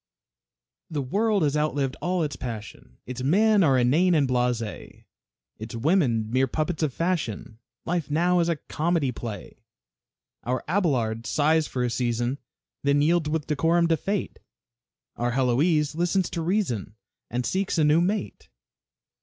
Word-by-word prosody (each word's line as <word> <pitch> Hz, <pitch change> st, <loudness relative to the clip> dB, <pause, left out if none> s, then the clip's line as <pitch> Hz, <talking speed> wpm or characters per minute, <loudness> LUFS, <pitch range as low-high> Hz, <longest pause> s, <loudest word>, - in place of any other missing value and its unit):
The 150 Hz, -4 st, -2 dB
world 205 Hz, -, +1 dB
has 145 Hz, -1 st, +1 dB
outlived 145 Hz, -3 st, 0 dB
all 180 Hz, -1 st, 0 dB
its 145 Hz, -3 st, -3 dB
passion, 110 Hz, -, -8 dB
Its 125 Hz, 0 st, -6 dB
men 205 Hz, +9 st, +4 dB
are 135 Hz, -5 st, +4 dB
inane 155 Hz, +9 st, +3 dB
and 145 Hz, -3 st, +3 dB
blase, 125 Hz, -5 st, -2 dB, 0.6 s
Its 110 Hz, +2 st, -7 dB
women 120 Hz, -, +1 dB
mere 130 Hz, +2 st, +2 dB
puppets 155 Hz, +5 st, -2 dB
of 155 Hz, -3 st, +1 dB
fashion; 125 Hz, -, -3 dB, 0.3 s
Life 170 Hz, -4 st, -2 dB
now 175 Hz, +4 st, +2 dB
is 170 Hz, 0 st, +1 dB
a 170 Hz, -, +1 dB
comedy 155 Hz, -1 st, -1 dB
play. 110 Hz, -5 st, -8 dB, 0.8 s
Our 125 Hz, 0 st, -2 dB
Abelard 125 Hz, -, 0 dB
sighs 155 Hz, +1 st, +2 dB
for 125 Hz, -, -2 dB
a 120 Hz, -, 0 dB
season, 120 Hz, +2 st, -1 dB, 0.4 s
Then 140 Hz, +1 st, +2 dB
yields 160 Hz, 0 st, +2 dB
with 155 Hz, -2 st, -1 dB
decorum 165 Hz, +3 st, +2 dB
to 165 Hz, -, +4 dB
fate. 200 Hz, +3 st, -3 dB, 0.8 s
Our 120 Hz, 0 st, -1 dB
Heloise 145 Hz, +5 st, +2 dB
listens 175 Hz, +3 st, 0 dB
to 170 Hz, -, -3 dB
reason, 160 Hz, -, -1 dB, 0.3 s
And 125 Hz, +1 st, -2 dB
seeks 190 Hz, +8 st, -1 dB
a 160 Hz, -, +3 dB
new 150 Hz, +3 st, +4 dB
mate. 200 Hz, +3 st, -2 dB
150 Hz, 145 wpm, -25 LUFS, 125-170 Hz, 0.8 s, men